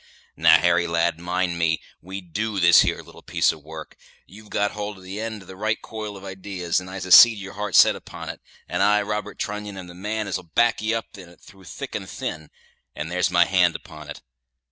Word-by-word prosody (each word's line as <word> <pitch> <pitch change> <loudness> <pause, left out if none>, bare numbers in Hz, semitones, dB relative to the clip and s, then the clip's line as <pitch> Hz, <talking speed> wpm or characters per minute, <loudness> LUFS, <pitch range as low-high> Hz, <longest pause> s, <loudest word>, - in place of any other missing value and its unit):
Now, - - +6
Harry, 85 0 +2
lad, 85 0 0
mind 90 0 -2
me, 80 -1 +1 0.2
we 95 +3 -7
do 105 +4 -3
this 85 -1 +7
here - - -1
little - - -15
piece - - +1
of 80 -2 -12
work. 80 0 -10 0.3
You've 105 +2 -15
got 105 0 0
hold 105 -1 -5
of 95 - -15
the 95 +2 -7
eend 110 -1 -5
of - - -19
the 95 - -10
right 110 +3 -1
coil 105 -2 -7
of 95 - -13
idees, 95 -2 -3
and 90 0 -10
I 95 +1 -6
can 95 0 -6
see 120 +5 +10
as 105 - -9
your 100 - -9
heart's 105 -1 0
set - - +7
upon - - -9
it; - - -8 0.3
and 90 +1 -2
I, 105 +1 +4
Robert 105 0 -4
Trunnion, 105 -1 -5
am 95 - -7
the 90 - -12
man 105 +4 -4
as'll 95 - -3
back 120 0 +3
ye 110 +1 0
up 115 -2 -4
in 90 -2 -12
it 85 - -19
through 95 -1 -17
thick - - -8
and - - -5
thin, 80 0 -6 0.5
and 80 +3 -5
there's 90 +1 +1
my 85 -1 +4
hand 90 -2 +3
upon 75 -3 -10
it. - - -9
95 Hz, 235 wpm, -23 LUFS, 85-105 Hz, 0.5 s, see